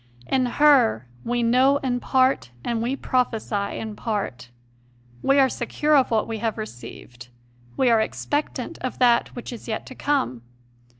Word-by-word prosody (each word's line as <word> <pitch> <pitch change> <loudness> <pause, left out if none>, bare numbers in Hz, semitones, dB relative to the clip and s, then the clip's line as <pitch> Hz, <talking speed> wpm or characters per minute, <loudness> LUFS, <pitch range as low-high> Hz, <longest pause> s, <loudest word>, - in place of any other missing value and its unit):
In 255 - +1
her 245 - +4 0.2
"we 240 0 -1
know 255 +4 +4
in 255 -3 -1
part, 260 - +2
and 235 -2 -1
we 245 +4 -1
prophesy 225 -6 -1
in 220 -1 -5
part"; 200 - -4 0.7
we 275 - +3
are 270 -1 +6
secure 295 +5 0
of 270 -3 +4
what 225 -2 +1
we 225 -1 -4
have 225 +1 -2
received, 125 - -9 0.5
we 260 - +3
are 225 -1 +4
expectant 280 +2 -3
of 255 - -4
that 240 -2 +3
which 245 0 -7
is 235 - -10
yet 220 -1 -3
to - - -10
come. 265 - -1
240 Hz, 160 wpm, -23 LUFS, 220-260 Hz, 0.7 s, are